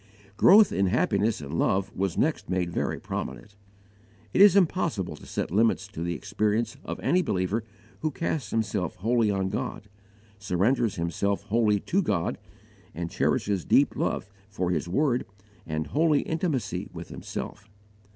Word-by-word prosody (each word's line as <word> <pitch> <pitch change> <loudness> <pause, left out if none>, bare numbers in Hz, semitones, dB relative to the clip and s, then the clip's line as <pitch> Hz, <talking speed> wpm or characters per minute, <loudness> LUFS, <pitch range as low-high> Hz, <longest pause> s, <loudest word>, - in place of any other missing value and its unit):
Growth 205 - +7
in 95 0 +1
happiness 110 -1 +1
and 70 - -7
love 95 0 +1
was 95 -2 -1
next 155 +2 0
made 90 -2 0
very - - -2
prominent. 100 - -6 0.8
It - - +4
is 200 -2 +8
impossible 165 - +1
to - - -14
set - - -3
limits 110 0 +2
to 95 -6 -7
the 85 0 -2
experience 110 - -1
of - - -5
any 180 - +3
believer 100 - -1 0.4
who 155 - 0
casts 150 -5 -3
himself 100 -6 -1
wholly 115 +2 +1
on 95 -1 0
God, 105 +2 -4 0.5
surrenders 100 +4 +1
himself 95 +4 -1
wholly 105 -1 +2
to 195 - +1
God, 85 - -1 0.6
and 85 +1 -4
cherishes 100 -4 0
deep - - +3
love - - -1 0.2
for 95 -3 -2
His 85 0 -1
word 125 - +1 0.4
and 80 0 -2
holy 155 -1 +2
intimacy 160 - -2
with - - -8
Himself. 100 +2 -7
105 Hz, 150 wpm, -27 LUFS, 90-125 Hz, 0.8 s, is